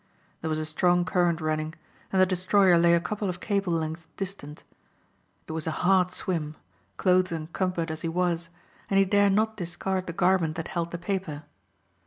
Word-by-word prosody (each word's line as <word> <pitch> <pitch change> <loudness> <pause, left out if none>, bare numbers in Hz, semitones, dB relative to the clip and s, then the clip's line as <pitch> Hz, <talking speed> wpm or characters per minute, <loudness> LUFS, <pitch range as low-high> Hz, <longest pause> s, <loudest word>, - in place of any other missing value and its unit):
There 160 - -3
was 155 - 0
a 155 - -2
strong 175 +3 +2
current 175 -3 +1
running 155 0 -2 0.4
and 190 - +2
the 185 - +7
destroyer 185 0 +4
lay 170 0 +5
a - - +3
couple 205 +3 -3
of 175 -1 -4
cable 200 -3 0
lengths 160 0 -3
distant. 185 -7 -6 0.8
It - - -6
was 160 0 -4
a 160 +2 -2
hard 185 -1 +4
swim, 165 -4 -3 0.4
clothes 185 -1 +3
encumbered 165 +1 -2
as 160 - -5
he 165 - -2
was, 170 -1 0 0.4
and 195 - +2
he 195 - +5
dare 200 +1 +4
not 220 +2 +1
discard 185 +1 -3
the 170 - -4
garment 175 -2 +2
that 165 - -5
held 170 -1 -2
the 175 - -5
paper. 175 -5 -4
175 Hz, 185 wpm, -27 LUFS, 160-190 Hz, 0.8 s, the